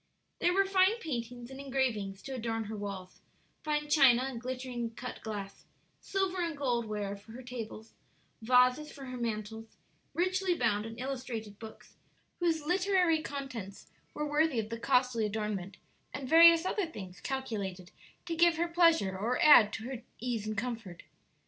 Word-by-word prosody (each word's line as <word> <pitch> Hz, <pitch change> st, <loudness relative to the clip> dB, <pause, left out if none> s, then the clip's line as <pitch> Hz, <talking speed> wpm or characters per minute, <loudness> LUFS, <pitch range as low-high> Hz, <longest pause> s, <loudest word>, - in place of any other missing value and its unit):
There 350 Hz, -, +3 dB
were 390 Hz, 0 st, +4 dB
fine 385 Hz, +3 st, +3 dB
paintings 245 Hz, -, -5 dB
and 265 Hz, -, -9 dB
engravings 245 Hz, -8 st, -2 dB
to 275 Hz, -, -7 dB
adorn 225 Hz, -2 st, -2 dB
her 215 Hz, +1 st, -6 dB
walls; 195 Hz, -3 st, -7 dB, 0.4 s
fine 300 Hz, -1 st, -1 dB
china, 270 Hz, -5 st, +5 dB
and 260 Hz, -3 st, -5 dB
glittering 250 Hz, -2 st, -4 dB
cut 250 Hz, 0 st, -7 dB
glass, 200 Hz, -3 st, -6 dB, 0.3 s
silver 385 Hz, -2 st, -1 dB
and 335 Hz, -3 st, -2 dB
gold 245 Hz, -4 st, 0 dB
ware 205 Hz, -2 st, -3 dB
for 205 Hz, +3 st, -14 dB
her 255 Hz, +2 st, -9 dB
tables; 230 Hz, -3 st, -8 dB, 0.5 s
vases 250 Hz, +5 st, +3 dB
for 275 Hz, -, -10 dB
her 255 Hz, -1 st, -6 dB
mantels; 220 Hz, -1 st, -5 dB, 0.4 s
richly 370 Hz, +1 st, +1 dB
bound 220 Hz, -5 st, 0 dB
and 225 Hz, +1 st, -9 dB
illustrated 245 Hz, -6 st, -5 dB
books, 220 Hz, -1 st, -12 dB, 0.4 s
whose 325 Hz, -3 st, 0 dB
literary 360 Hz, -2 st, +2 dB
contents 255 Hz, -10 st, -6 dB, 0.3 s
were 300 Hz, -, -2 dB
worthy 295 Hz, -3 st, +2 dB
of 215 Hz, -1 st, -3 dB
the 230 Hz, 0 st, -5 dB
costly 250 Hz, -3 st, +2 dB
adornment, 210 Hz, -3 st, -3 dB, 0.4 s
and 265 Hz, -1 st, -5 dB
various 335 Hz, +2 st, +8 dB
other 380 Hz, -1 st, 0 dB
things 190 Hz, -, -9 dB
calculated 200 Hz, -9 st, -4 dB, 0.3 s
to 335 Hz, -1 st, -3 dB
give 340 Hz, 0 st, +4 dB
her 340 Hz, +1 st, +1 dB
pleasure 335 Hz, -, +3 dB
or 225 Hz, +6 st, -1 dB
add 235 Hz, -9 st, +8 dB
to 220 Hz, -, -5 dB
her 250 Hz, 0 st, -6 dB, 0.2 s
ease 230 Hz, -4 st, -3 dB
and 215 Hz, -1 st, -3 dB
comfort. 225 Hz, -6 st, -5 dB
250 Hz, 160 wpm, -31 LUFS, 220-305 Hz, 0.5 s, various